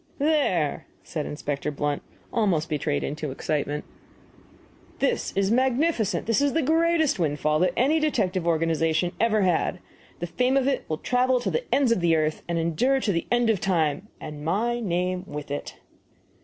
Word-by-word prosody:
"There!" 280 - +1 0.2
said 155 -3 -4
Inspector 145 0 -3
Blunt, 145 0 -1 0.3
almost 185 -9 +1
betrayed 150 -1 -1
into 150 +1 -3
excitement, 145 +2 -2 1.1
"this - - 0
is 195 +1 +2
magnificent! 260 - +1
This 230 +3 +2
is 285 -1 +2
the 325 - +1
greatest 320 - +2
windfall 155 -1 +1
that 185 - +2
any 290 +6 +3
detective 185 - 0
organization 165 +1 +1
ever 220 -1 +3
had. 180 -3 +1 0.4
The 175 - -3
fame 250 +9 +1
of 270 -1 +2
it 275 -2 0
will 155 - -1
travel 250 +6 +2
to - - -1
the 480 - -1
ends 275 -4 +3
of 230 - +2
the 170 -1 +3
earth, 155 0 0
and 170 -1 -1
endure 170 - +1
to 220 - 0
the 170 -3 -2
end 240 -1 +3
of 205 - 0
time, 180 0 0
and 150 -1 -8
my 225 +9 0
name 180 -3 -1
with 145 -1 -7
it." 145 - -5
185 Hz, 170 wpm, -25 LUFS, 155-250 Hz, 1.1 s, any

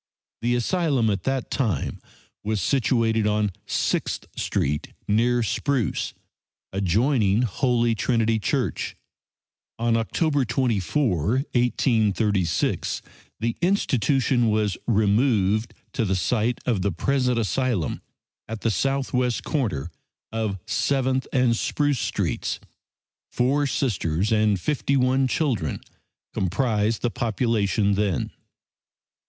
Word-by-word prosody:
The 120 +1 +1
Asylum 135 - +1
at 100 -3 -3
that 135 -2 -1
time 105 - -1 0.4
was 110 0 -1
situated 115 - +2
on 105 -1 +1 0.2
Sixth - - -1
street, 75 +2 -1
near 120 +3 +2
Spruce, 130 - -1 0.6
adjoining 105 - +2
Holy 120 +1 +1
Trinity 115 0 +1
Church. - - -1 0.8
On 115 0 +1
October 145 +5 +1
24, 115 - +1 0.4
1836, 110 - +1 0.4
the 115 +1 -1
institution 135 - +2
was 105 -3 +1
removed 110 -1 +2 0.2
to - - 0
the 95 -3 0
site 115 +5 0
of 115 -7 +1
the 100 +1 +1
present 125 +6 +1
asylum 115 - 0 0.5
at 110 0 -6
the 115 - +1
southwest 130 -1 0
corner 95 - -2 0.4
of 110 -3 -2
Seventh 130 -1 0
and 125 -3 +3
Spruce 145 +2 0
streets. - - -2 0.7
Four 140 +4 +1
Sisters 100 - 0
and 105 -3 +3
fifty 140 - 0
one 130 +1 +3
children 125 - -1 0.5
comprised 105 +3 0
the 120 - +1
population 110 -3 +1
then. 100 -5 0
115 Hz, 100 wpm, -24 LUFS, 105-130 Hz, 0.8 s, and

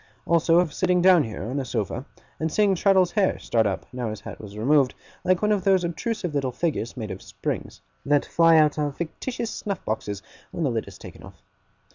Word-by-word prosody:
Also 165 0 +3
of 175 -3 +2
sitting 180 -1 +2
down 180 -3 +6
here, 110 -5 -6
on 125 +7 -3
a - - -2
sofa, 115 +1 -3 0.3
and 160 0 -1
seeing 205 +2 +3
Traddles's 190 -1 +3
hair 200 -3 +2
start 110 -2 +1
up, 95 - -3
now 125 -3 -3
his 110 -1 -6
hat - - -9
was 105 -1 -10
removed, 135 +3 +3 0.3
like 185 +2 +2
one 210 - +3
of 205 -3 +1
those 190 -2 +3
obtrusive 180 0 -3
little 135 -3 0
figures 130 -3 -2
made 110 -4 -4
of 95 - -7
springs, - - -5 0.2
that 145 0 +2
fly 165 -1 +5
out 150 -1 +4
of 145 -2 -2
fictitious 225 +7 -4
snuff 200 -3 -5
boxes 105 -2 -3 0.3
when 170 - -4
the 140 - +1
lid 115 -2 -2
is - - -11
taken - - -12
off. - - -14
155 Hz, 210 wpm, -25 LUFS, 120-180 Hz, 0.3 s, down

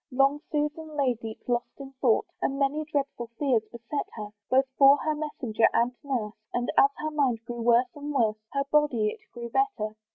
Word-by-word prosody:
Long 275 +2 +2
Susan 300 +1 -2
lay 270 -3 +3
deep 225 -1 -9
lost 240 +1 -2
in 270 -1 -8
thought, 240 -5 +3 0.2
And 275 - 0
many 285 +2 0
dreadful 275 -4 -2
fears 265 -6 +2
beset 235 +5 -4
her, 210 -2 -6 0.2
Both 265 +1 +4
for 275 0 +7
her 310 +1 -1
messenger 260 -7 0
and 240 +2 +2
nurse; 240 -7 -2 0.2
And 245 0 0
as 275 - +6
her 310 0 -3
mind 255 -6 0
grew 240 0 -5
worse 235 +2 +5
and 290 0 -5
worse, 225 -6 +2
Her 275 0 0
body 275 -8 +3
it - - -8
grew 235 -1 -7
better. 245 - 0
265 Hz, 190 wpm, -27 LUFS, 235-290 Hz, 0.2 s, for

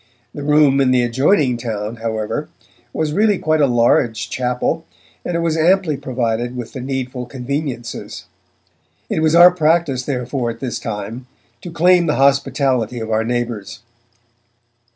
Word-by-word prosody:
The 145 - -7
Room 145 -1 +4
in 130 - +3
the 125 -1 +3
adjoining 130 - +2
town, 110 -1 -4
however, 110 -2 -3 0.4
was 155 -1 -2
really 210 +1 +3
quite 155 -2 +1
a 140 - +4
large 115 -2 +1
chapel, 125 +6 -1 0.4
and 175 - -3
it 170 - 0
was 165 -1 0
amply 170 0 +2
provided 120 -2 -2
with 120 -2 -7
the 130 - -6
needful 130 -1 -4
conveniences. 130 -1 -5 0.9
It - - 0
was 160 0 +3
our 175 +1 +9
practice, 160 -5 +1
therefore, 125 -2 -2
at 115 0 -7
this 125 -1 -4
time, 110 +3 -6 0.3
to - - -7
claim 175 +1 +3
the 150 - +1
hospitality 135 -3 +1
of 110 0 -5
our 110 +1 +1
neighbours. 115 -3 -4
130 Hz, 150 wpm, -18 LUFS, 120-155 Hz, 0.9 s, our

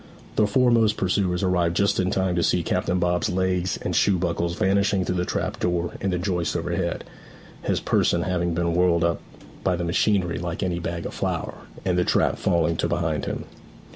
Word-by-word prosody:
The 105 - +3
foremost 115 -1 +3
pursuers 95 -1 0
arrived 90 -2 +1
just 100 +2 +2
in 95 -1 +1
time 95 -2 0
to 85 - +1
see 85 0 +2
Captain 90 +2 0
Bob's 90 0 +1
legs 95 0 0
and - - -2
shoe 100 -2 +3
buckles 85 -1 -1
vanishing 100 0 +2
through 90 - -1
the 90 - 0
trap - - -3
door 85 -1 0
in 100 - 0
the 90 - 0
joists 85 -4 -1
overhead, - - -2 0.6
his - - 0
person 85 0 +1
having 85 -2 -1
been 85 0 0
whirled 85 -1 +3
up 85 -2 0 0.4
by 95 - +2
the 85 - -3
machinery 90 +1 +1
like 85 +1 -3
any 90 -2 -1
bag 85 0 -4
of - - -5
flour, - - -2 0.3
and 90 -1 +1
the - - +3
trap - - +1
falling 85 -2 +1
to - - 0
behind 85 -4 -1
him. - - -4
90 Hz, 195 wpm, -24 LUFS, 85-95 Hz, 0.6 s, The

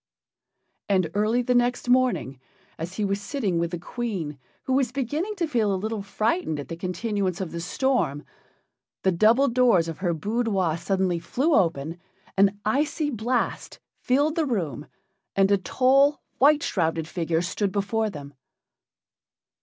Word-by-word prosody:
And 185 -5 +2
early 215 +4 +1
the 250 - +1
next 245 0 +1
morning, 245 - +2 0.4
as 170 +4 -5
he 210 - -1
was 200 0 -1
sitting 205 - -1
with 170 0 0
the 175 - -4
Queen, 175 - -4 0.2
who 260 - -1
was 260 -3 +2
beginning 290 - -2
to 350 - 0
feel 230 -9 +1
a 190 - 0
little 215 +2 -3
frightened 205 - -1
at 140 - -7
the 165 - -4
continuance 185 +1 -2
of 185 -4 -4
the 170 - -5
storm, 180 - 0 0.8
the 190 - +3
double 225 +10 +4
doors 235 -9 +3
of 165 -1 -6
her 175 -3 0
boudoir 200 -2 0
suddenly 185 0 0
flew 285 - 0
open, 165 - +1 0.4
an 195 +1 +3
icy 295 +5 0
blast 240 +1 -2 0.2
filled 285 +4 +2
the 325 -2 0
room, 160 - -2 0.5
and 195 0 +3
a 200 - +5
tall, 270 +7 +3 0.2
white 290 +2 +5
shrouded 165 -3 -1
figure 165 -1 -1
stood 195 +3 -1
before 215 +2 0
them. 145 -5 -9
205 Hz, 155 wpm, -25 LUFS, 170-250 Hz, 0.8 s, a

